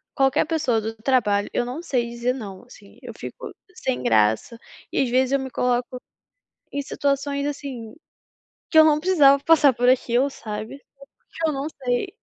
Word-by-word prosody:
qualquer 270 Hz, +1 st, +2 dB
pessoa 300 Hz, -8 st, 0 dB
do 220 Hz, +1 st, -5 dB
trabalho, 215 Hz, -4 st, +1 dB
eu -, -, +1 dB
não 255 Hz, +7 st, -6 dB
sei 245 Hz, -7 st, -1 dB
dizer 235 Hz, +1 st, -1 dB
"não", 200 Hz, -6 st, -8 dB
assim. 230 Hz, -4 st, -17 dB
Eu -, -, -8 dB
fico -, -, -9 dB, 0.2 s
sem 260 Hz, -6 st, -2 dB
graça 110 Hz, -, +1 dB, 0.3 s
e, -, -, +1 dB
às 255 Hz, -, -2 dB
vezes, 260 Hz, +1 st, +2 dB
eu 275 Hz, -, +3 dB
me 265 Hz, -1 st, -6 dB
coloco 250 Hz, +1 st, -1 dB, 0.7 s
em 285 Hz, -, -2 dB
situações 280 Hz, 0 st, -1 dB
assim, 270 Hz, -6 st, -6 dB, 0.8 s
que 320 Hz, -, +4 dB
eu 315 Hz, -, +9 dB
não 305 Hz, -1 st, +3 dB
precisava 290 Hz, -6 st, +4 dB
passar 300 Hz, -4 st, +5 dB
por 245 Hz, +1 st, +1 dB
aquilo, 255 Hz, +1 st, +2 dB
sabe. 215 Hz, +2 st, -7 dB, 0.5 s
Porque 325 Hz, -1 st, -2 dB
eu -, -, 0 dB
não 275 Hz, +1 st, -3 dB, 0.2 s
sei 245 Hz, +7 st, 0 dB
255 Hz, 170 wpm, -23 LUFS, 235-280 Hz, 0.8 s, eu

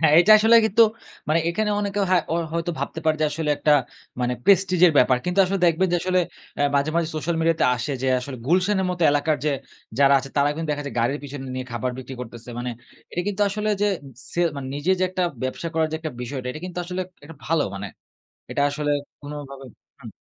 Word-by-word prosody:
হ্যাঁ, 160 Hz, -2 st, +4 dB
এটা 215 Hz, +4 st, +6 dB
আসলে 225 Hz, +2 st, +6 dB
কিন্তু 220 Hz, +2 st, +5 dB, 0.5 s
মানে 160 Hz, +2 st, +3 dB
এখানে 210 Hz, +5 st, 0 dB
অনেকে 205 Hz, 0 st, -2 dB
হা 185 Hz, -, +5 dB, 0.4 s
হয়তো 170 Hz, +1 st, -1 dB
ভাবতে 160 Hz, -, -4 dB
পারে 155 Hz, -1 st, +2 dB
যে -, -, +3 dB
আসলে 160 Hz, -2 st, -1 dB
একটা 150 Hz, -, +3 dB, 0.5 s
মানে 125 Hz, 0 st, 0 dB
প্রেস্টিজ 190 Hz, -2 st, +4 dB
এর 170 Hz, -, +4 dB
ব্যাপার। 125 Hz, 0 st, +5 dB
কিন্তু 180 Hz, +2 st, -2 dB
আসলে 195 Hz, +2 st, -1 dB
দেখবেন 170 Hz, +3 st, +3 dB
যে -, -, +4 dB
আসলে 185 Hz, 0 st, +2 dB, 0.4 s
আ -, -, +4 dB
মাঝে, 140 Hz, +2 st, +2 dB
মাঝে 170 Hz, -2 st, +1 dB
সোশ্যাল 160 Hz, +2 st, -1 dB
মিডিয়া 165 Hz, 0 st, +2 dB
তে -, -, +4 dB
আসে 135 Hz, +4 st, -3 dB
যে -, -, 0 dB
আসলে, 130 Hz, +1 st, -7 dB
গুলশানের 185 Hz, +4 st, +2 dB
মত 180 Hz, -, -4 dB
এলাকার 145 Hz, +1 st, +1 dB
যে 150 Hz, -, +2 dB, 0.5 s
যারা 140 Hz, 0 st, +6 dB
আছে 135 Hz, -, -6 dB
তারা 140 Hz, 0 st, +4 dB
কিন্তু 160 Hz, +1 st, -4 dB
দেখা 145 Hz, 0 st, -2 dB
যায় 140 Hz, -, -6 dB
গাড়ির 120 Hz, +5 st, +1 dB
পেছনে 140 Hz, -1 st, -7 dB
নিয়ে 130 Hz, 0 st, -4 dB
খাবার 120 Hz, +2 st, -2 dB
বিক্রি 130 Hz, +1 st, -7 dB
করতেছে। 120 Hz, -1 st, -9 dB
মানে 125 Hz, 0 st, -3 dB, 0.4 s
এটা 175 Hz, -, -2 dB
কিন্তু 205 Hz, 0 st, 0 dB
আসলে 210 Hz, +2 st, -2 dB
যে -, -, +4 dB, 0.5 s
ছে 175 Hz, -, -1 dB, 0.2 s
মানে 140 Hz, -2 st, -5 dB
নিজে 145 Hz, +6 st, -1 dB
যে -, -, +4 dB
একটা 185 Hz, 0 st, -1 dB, 0.2 s
ব্যবসা 130 Hz, +6 st, -3 dB
করার 160 Hz, -1 st, +2 dB
যে -, -, 0 dB
একটা 160 Hz, -1 st, -4 dB
বিষয়টা 125 Hz, +1 st, -5 dB
এটা 155 Hz, -, -7 dB
কিন্তু 180 Hz, -1 st, -6 dB
আসলে 180 Hz, +1 st, -4 dB, 0.2 s
একটা 155 Hz, +1 st, -12 dB
ভালো, 160 Hz, -1 st, +2 dB
মানে 100 Hz, +1 st, -5 dB, 0.7 s
এটা -, -, 0 dB
আসলে 145 Hz, +1 st, -2 dB, 0.3 s
কোনোভাবে 145 Hz, -2 st, -8 dB, 0.3 s
হুম। -, -, -9 dB
155 Hz, 215 wpm, -23 LUFS, 140-180 Hz, 0.7 s, এটা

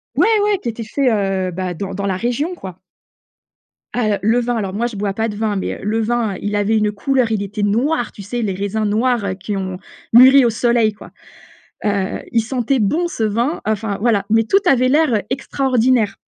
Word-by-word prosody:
Ouais, -, -, +4 dB, 0.2 s
ouais 415 Hz, -2 st, +1 dB
qui 245 Hz, -, -4 dB
était 230 Hz, 0 st, -5 dB
fait, 260 Hz, +3 st, +1 dB, 0.4 s
heu, -, -, -4 dB
bah, 180 Hz, 0 st, -3 dB
dans 195 Hz, +3 st, -5 dB
dans 200 Hz, +1 st, -3 dB
la 195 Hz, -2 st, 0 dB
région, 245 Hz, -, -2 dB
quoi. 185 Hz, -, -9 dB, 1.1 s
Ah 245 Hz, -3 st, 0 dB
heu, -, -, -7 dB
le 225 Hz, +4 st, +3 dB
vin- 245 Hz, 0 st, -1 dB
alors 195 Hz, -4 st, -3 dB
moi 230 Hz, +4 st, -1 dB
je 235 Hz, -, -8 dB
bois 200 Hz, 0 st, -2 dB
pas 225 Hz, +3 st, -1 dB
de 210 Hz, -, -6 dB
vin 215 Hz, -1 st, -1 dB
mais 190 Hz, -, -2 dB
heu, -, -, -12 dB
le 215 Hz, +3 st, 0 dB
vin, 225 Hz, -2 st, -1 dB
il 205 Hz, 0 st, -2 dB
avait 205 Hz, +2 st, +1 dB
une 210 Hz, -1 st, +1 dB
couleur, 245 Hz, +2 st, 0 dB
il 215 Hz, -, 0 dB
était 205 Hz, +1 st, -4 dB
noir, 240 Hz, +5 st, 0 dB
tu -, -, -11 dB
sais, 240 Hz, +5 st, -4 dB
les 205 Hz, -4 st, -1 dB
raisins 200 Hz, +3 st, -2 dB
noirs, 230 Hz, +1 st, +1 dB
heu, 190 Hz, -, -1 dB
qui 190 Hz, +2 st, -5 dB
ont 190 Hz, -1 st, -4 dB, 0.4 s
mûri 260 Hz, +3 st, +8 dB
au -, -, +4 dB
soleil, 230 Hz, -1 st, +2 dB
quoi. 205 Hz, -, -14 dB, 0.7 s
Heu, 200 Hz, -2 st, -1 dB
il 230 Hz, -, +3 dB
sentait 255 Hz, +3 st, -1 dB
bon, 305 Hz, -, +1 dB
ce 235 Hz, -, -5 dB
vin, 230 Hz, +8 st, 0 dB
heu, -, -, -12 dB
enfin 215 Hz, -1 st, -3 dB
voilà 210 Hz, -3 st, +1 dB
mais 225 Hz, +1 st, +4 dB
tout 385 Hz, -, +3 dB
avait 255 Hz, -1 st, +4 dB
l'air 265 Hz, -7 st, +2 dB
extraordinaire 255 Hz, -4 st, +1 dB
220 Hz, 220 wpm, -18 LUFS, 205-245 Hz, 1.1 s, mûri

